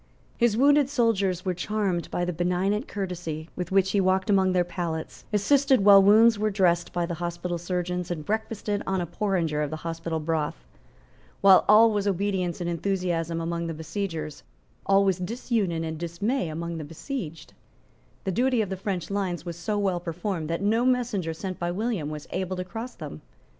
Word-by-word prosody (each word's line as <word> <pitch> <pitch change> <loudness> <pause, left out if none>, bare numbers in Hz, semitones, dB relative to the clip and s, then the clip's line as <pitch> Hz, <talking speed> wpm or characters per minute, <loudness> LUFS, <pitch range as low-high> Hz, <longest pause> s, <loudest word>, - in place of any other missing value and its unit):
His 235 -2 +2
wounded 285 +1 +5
soldiers 200 -9 +1
were 185 - +1
charmed 190 -1 -1
by 175 - -1
the 180 - -2
benignant 180 - 0
courtesy 175 -5 -5
with 180 0 -4
which 190 0 +3
he 200 - +2
walked 190 +2 +2
among 190 -1 +4
their 180 -1 +3
pallets, 170 -2 -5
assisted 260 +2 +3
while 200 -1 +9
wounds 215 +2 +6
were 215 0 +1
dressed 175 -4 +2
by 175 -1 -1
the 170 - -4
hospital 175 0 -3
surgeons, 180 0 -2
and 160 -4 -4
breakfasted 215 -1 -2
on 190 -1 0
a 175 - -1
porringer 170 -4 -1
of 150 - -1
the 155 - -4
hospital 165 0 -3
broth. 155 - -2 0.8
While 195 -1 +7
all 220 +2 +7
was 205 -1 0
obedience 190 -2 -1
and 175 - -3
enthusiasm 170 -2 -1
among 170 0 -2
the 165 - -4
besiegers, 160 -2 -4 0.5
all 195 0 +5
was 190 -2 +1
disunion 195 -4 -1
and 160 -1 -4
dismay 175 +5 -1
among 165 +1 -4
the - - -5
besieged. 165 - -6 0.7
The 190 - -1
duty 245 +3 +2
of 200 - -6
the 190 - -2
French 190 -1 -3
lines 185 -4 -2
was 170 -1 -5
so 205 +5 -2
well 195 -3 0
performed 170 -1 -4
that 165 +4 -2
no 225 +4 +2
messenger 240 -9 +1
sent 185 +2 -5
by 175 - -1
William 195 -4 -2
was 150 -1 -6
able 185 0 -2
to 180 - -2
cross 225 +6 -7
them. 75 - -8
185 Hz, 185 wpm, -26 LUFS, 170-205 Hz, 0.8 s, while